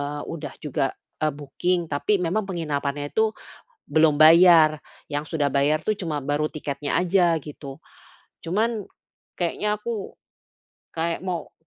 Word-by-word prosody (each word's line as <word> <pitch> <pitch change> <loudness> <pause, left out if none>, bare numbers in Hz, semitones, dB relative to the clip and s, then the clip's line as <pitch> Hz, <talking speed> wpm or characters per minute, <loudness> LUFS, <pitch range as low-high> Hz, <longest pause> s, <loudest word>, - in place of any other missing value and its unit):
eee, 145 +1 -4
udah 160 -2 -6
juga, 135 -2 0 0.3
eee, 155 -2 +1
booking, 175 +5 -1
tapi 175 +9 +1
memang 195 +4 -1
penginapannya 145 -4 -3
itu 220 0 +3 0.6
belum 155 -1 +3
bayar, 160 -2 +7 0.3
yang 145 +1 -2
sudah 145 -4 0
bayar 145 +3 +2
tuh 215 -1 0
cuma 155 -5 -3
baru 145 +2 0
tiketnya 145 -1 -4
aja, 180 -2 +3
gitu. 145 -1 -9 0.7
Cuman 215 +4 0 0.5
kayaknya 210 +4 0
aku, 220 -3 -5 0.8
kayak 165 +1 -2
mau 180 -4 -4
160 Hz, 130 wpm, -24 LUFS, 145-180 Hz, 0.8 s, bayar